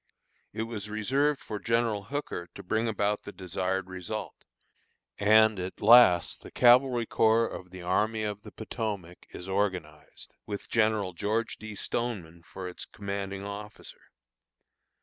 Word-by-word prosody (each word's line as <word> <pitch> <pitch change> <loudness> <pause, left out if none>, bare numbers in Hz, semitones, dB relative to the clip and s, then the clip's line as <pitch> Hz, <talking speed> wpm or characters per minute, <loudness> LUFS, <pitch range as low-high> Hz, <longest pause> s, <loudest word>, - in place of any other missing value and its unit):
It 110 - -3
was 110 -3 -6
reserved 135 +7 +1
for 105 - -6
General 115 -3 0
Hooker 120 -9 -4
to - - -9
bring 110 +5 0
about 105 -1 0
the - - -9
desired 95 0 -2
result; 95 -1 -6 0.7
and, 110 0 +5
at 90 +1 -5
last, 110 -5 +6
the - - -11
Cavalry 125 0 +5
Corps 115 +1 +3
of 90 - -8
the 90 0 -10
Army 110 +4 +1
of 105 -1 -3
the 105 - -11
Potomac 105 -6 -5
is 90 - -9
organized, 90 -6 -3
with 100 -1 -5
General 110 -4 +1
George 110 +6 -1
D. 110 -1 -8
Stoneman 100 -8 -4
for 90 +2 -8
its 90 - -7
commanding 100 -1 -5
officer. 105 +1 -9
105 Hz, 140 wpm, -29 LUFS, 95-110 Hz, 0.7 s, last